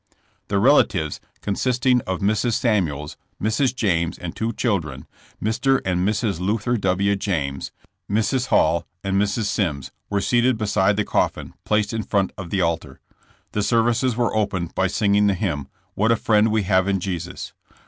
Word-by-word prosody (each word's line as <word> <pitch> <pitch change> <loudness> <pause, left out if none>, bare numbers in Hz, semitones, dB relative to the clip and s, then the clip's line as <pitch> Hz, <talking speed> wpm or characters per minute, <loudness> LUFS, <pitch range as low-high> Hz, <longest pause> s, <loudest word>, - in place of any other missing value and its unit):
The 100 - 0
relatives, 100 - +3 0.2
consisting 125 +4 +1
of 95 +1 -2
Mrs. 110 +4 +1
Samuels, 85 - 0 0.2
Mrs. 120 +5 +1
James 85 -8 0
and 85 -2 -7
two 115 +1 -1
children, 85 - -2 0.3
Mr. 130 +5 +1
and 90 -1 0
Mrs. 100 -1 0
Luther 105 +5 0
W. 100 -1 +1
James, 75 -9 -2 0.4
Mrs. 110 +5 +1
Hall 85 +2 +2 0.2
and 95 0 +1
Mrs. 105 +2 0
Mimms, 70 -9 -1 0.2
were 100 - 0
seated 120 +3 +2
be 110 - -2
side 100 0 +2
the 105 - +1
coffin, - - -1
placed 105 +1 +1
in 110 - -1
front 100 -2 0
of 95 -3 -7
the 95 +1 0
altar. 85 -2 -2 0.5
The 105 - -1
ser 115 +2 +3
vices 120 +1 +1
were 120 -1 0
opened 100 -5 -1
by 95 - +1
singing 100 +1 +2
the 100 - +2
hymn, 85 -9 -2 0.3
''What 110 +3 +2
a - - +5
Friend 110 -1 +3
We 110 -1 +1
Have 95 0 +2
in 100 -1 +1
Jesus.'' 90 -1 -5
100 Hz, 170 wpm, -22 LUFS, 90-110 Hz, 0.5 s, a